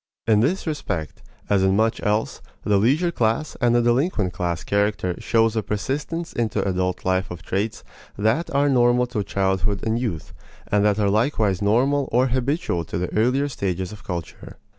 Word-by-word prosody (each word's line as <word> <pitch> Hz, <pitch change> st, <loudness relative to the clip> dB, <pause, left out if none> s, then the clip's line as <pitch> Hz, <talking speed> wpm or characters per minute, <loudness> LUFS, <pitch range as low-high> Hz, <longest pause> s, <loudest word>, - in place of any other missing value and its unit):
In 110 Hz, -2 st, +4 dB
this 155 Hz, -, +1 dB
respect, 100 Hz, -, -4 dB, 0.3 s
as 100 Hz, -2 st, +2 dB
in 95 Hz, 0 st, +3 dB
much 110 Hz, +2 st, +1 dB
else, 105 Hz, +2 st, -1 dB, 0.2 s
the 100 Hz, -1 st, +2 dB
leisure 150 Hz, -, +2 dB
class 115 Hz, +2 st, 0 dB
and 120 Hz, -1 st, +3 dB
the 120 Hz, -, +3 dB
delinquent 120 Hz, -, +1 dB
class 85 Hz, -2 st, -2 dB
character 100 Hz, -3 st, 0 dB
shows 115 Hz, 0 st, +2 dB
a 110 Hz, -, +1 dB
persistence 145 Hz, -, -3 dB
into 115 Hz, -4 st, -1 dB
adult 90 Hz, -1 st, -1 dB
life 95 Hz, 0 st, +1 dB
of 85 Hz, -2 st, -8 dB
traits 100 Hz, +6 st, -2 dB, 0.3 s
that 110 Hz, +11 st, +1 dB
are 140 Hz, +1 st, +2 dB
normal 125 Hz, -2 st, +3 dB
to 120 Hz, -4 st, -3 dB
childhood 95 Hz, +1 st, -1 dB
and 110 Hz, +1 st, 0 dB
youth, 105 Hz, -11 st, -4 dB, 0.3 s
and 105 Hz, 0 st, +2 dB
that 105 Hz, -1 st, +3 dB
are 100 Hz, -2 st, +2 dB
likewise 110 Hz, -4 st, +1 dB
normal 130 Hz, +7 st, +2 dB
or 125 Hz, +2 st, +3 dB
habitual 130 Hz, -, -1 dB
to -, -, -4 dB
the 90 Hz, 0 st, -3 dB
earlier 125 Hz, +6 st, +2 dB
stages 95 Hz, -8 st, -3 dB
of 105 Hz, -2 st, -11 dB
culture. 85 Hz, -4 st, -7 dB
110 Hz, 175 wpm, -23 LUFS, 95-125 Hz, 0.3 s, In